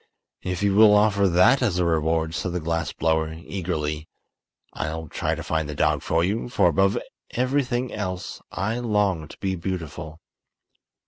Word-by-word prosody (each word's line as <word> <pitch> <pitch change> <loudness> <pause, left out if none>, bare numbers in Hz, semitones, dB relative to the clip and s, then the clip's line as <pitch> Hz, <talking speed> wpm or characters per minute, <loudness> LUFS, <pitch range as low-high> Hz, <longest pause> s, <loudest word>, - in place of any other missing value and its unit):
"If 90 +1 -3
you 100 -1 +3
will 105 0 +7
offer 105 -1 +4
that 90 +10 +5
as 105 -8 +1
a 90 - +2
reward," 80 0 +1
said 90 +1 -2
the 90 - -1
glass 80 -1 -2
blower, 80 0 0
eagerly, 80 -3 -4 0.6
"I'll 80 +1 -4
try - - -2
to - - -6
find 80 -2 -1
the 75 - -5
dog - - +2
for 80 +1 +1
you, 105 +7 -1
for 90 - +3
above 95 +3 +2 0.3
everything 130 -1 0
else 95 -4 -4
I 110 +5 -2
long 105 -9 0
to - - -13
be 95 -1 -2
beautiful." 80 -3 -5
90 Hz, 165 wpm, -24 LUFS, 80-105 Hz, 0.6 s, will